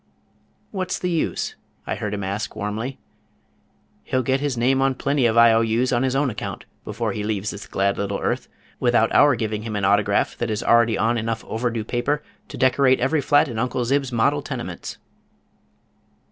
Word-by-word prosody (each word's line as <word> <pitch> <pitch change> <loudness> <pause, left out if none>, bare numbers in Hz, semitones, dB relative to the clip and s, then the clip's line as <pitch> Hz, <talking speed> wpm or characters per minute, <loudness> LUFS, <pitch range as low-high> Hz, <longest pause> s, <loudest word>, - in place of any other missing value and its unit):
"What's 185 -3 -2
the 180 - -2
use?" 165 - -1 0.3
I - - -2
heard 105 -1 -3
him 100 - -4
ask, 100 +2 -3
warmly. 110 +6 -4 1.0
"He'll 130 - -1
get 130 +2 +1
his 140 -3 -2
name 130 +3 +2
on 135 -1 +2
plenty 140 -1 +1
of 115 0 0
I. 115 -1 +7
O. 115 - +4
U.'s 115 +3 +1
on 120 - +2
his 130 0 0
own 140 -2 +1
account 105 - -6 0.2
before - - -3
he 105 - -4
leaves 105 -1 -2
this 100 -1 -9
glad 100 0 0
little 100 0 -1
earth, - - -2 0.3
without 120 -2 +2
our 145 -2 +6
giving 110 -2 -2
him 110 -1 -5
an 100 -2 0
autograph 100 0 +2
that 120 - -1
is 105 -1 -2
already 115 -1 +4
on 115 +1 +1
enough 110 0 -3
over 115 +3 -1
due 115 -2 -3
paper 135 +6 -1 0.2
to - - -9
decorate 130 0 +3
every 140 +5 +1
flat 145 +3 +4
in 115 -4 -4
Uncle 125 +1 -1
Zib's 135 +1 0
model 110 -10 +2
tenements." - - -6
120 Hz, 190 wpm, -22 LUFS, 110-130 Hz, 1.0 s, I